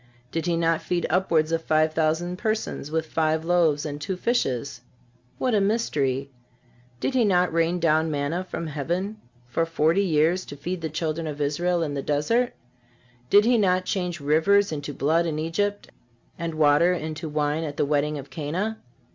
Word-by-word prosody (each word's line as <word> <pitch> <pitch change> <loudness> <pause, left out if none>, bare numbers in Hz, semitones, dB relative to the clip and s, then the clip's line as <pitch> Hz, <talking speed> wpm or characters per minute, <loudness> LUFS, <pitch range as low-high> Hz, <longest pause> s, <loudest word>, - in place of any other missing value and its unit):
Did 165 +1 -2
He 170 -1 +1
not 165 -1 +1
feed 175 -1 -1
upwards 165 -4 +2
of 165 0 +1
five 155 0 +2
thousand 165 +3 0
persons 220 - -2
with 160 +1 -1
five 160 0 0
loaves 165 -4 +2
and 145 -1 -5
two 185 +5 -3
fishes? 140 - -1 0.6
What 255 -2 0
a 210 - +3
mystery! 140 - 0 0.7
Did 270 - -1
He 255 -2 +3
not 180 -4 +2
rain 165 +2 +1
down 160 -1 +2
manna 150 +4 -1
from 175 -2 -5
heaven 175 +8 -3 0.3
for 120 +7 0
forty 165 +2 +2
years 170 0 +2
to 145 - -9
feed 175 +5 -4
the 160 - -3
children 160 +1 -2
of 150 -1 -5
Israel 170 +4 0
in 150 -3 -3
the 140 - -2
desert? 230 - +1 0.8
Did 205 +1 +6
He 240 -1 +4
not 185 -2 +2
change 180 -4 -2
rivers 165 +8 +3
into 145 -1 -4
blood 160 +5 +1
in 155 -2 -2
Egypt, 200 +6 -2 0.4
and 165 -1 -4
water 155 +3 +4
into 160 -1 -4
wine 150 +1 0
at 145 -2 -5
the - - +2
wedding 150 +1 0
of 140 -1 -9
Cana? 175 +10 -3
165 Hz, 175 wpm, -25 LUFS, 150-180 Hz, 0.8 s, Did